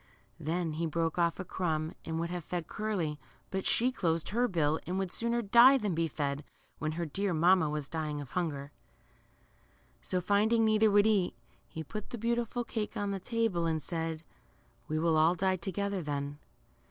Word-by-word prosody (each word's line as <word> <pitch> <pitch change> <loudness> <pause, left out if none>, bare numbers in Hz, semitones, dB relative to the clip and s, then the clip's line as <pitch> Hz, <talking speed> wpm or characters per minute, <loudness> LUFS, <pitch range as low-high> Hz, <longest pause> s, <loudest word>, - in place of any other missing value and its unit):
Then 165 +1 -1
he 165 +2 -1
broke 165 +1 -1
off 170 +1 +2
a 185 - -4
crumb 160 -3 -1
and 160 0 -3
would 170 +1 -2
have 175 -2 -4
fed 175 +1 -3
Curly, 185 -9 -2 0.3
but 190 -1 -2
she 250 +3 +3
closed 165 -9 0
her 240 +4 +2
little - - -9
bill, 160 -3 +1
and 180 +2 -1
would 190 -2 -1
sooner 235 +3 0
die 240 +6 +7
than 210 -7 -1
be 165 0 +1
fed, 145 -1 -2 0.4
when 155 0 -1
her 170 +1 -2
dear 190 +4 -1
mamma 170 0 +4
was 150 -2 -3
dying 155 -2 -3
of 140 -4 -8
hunger. 145 -5 -2 1.3
So, 185 - -1
finding 215 +5 +3
neither 215 0 +4
would 205 0 +5
eat, 205 -5 +2 0.3
he 160 - -6
put 210 +7 -7
the 240 - -5
beautiful 235 +1 -1
cake 225 -1 -4
on 205 -1 -1
the 195 - -2
table, 220 -5 0
and 160 -1 0
said, 165 0 -3 0.6
We 155 - -1
will 160 0 +2
all 160 +3 +4
die 185 +1 +1
together 195 +2 -2
thep.." 145 -2 -3
175 Hz, 190 wpm, -31 LUFS, 160-205 Hz, 1.3 s, die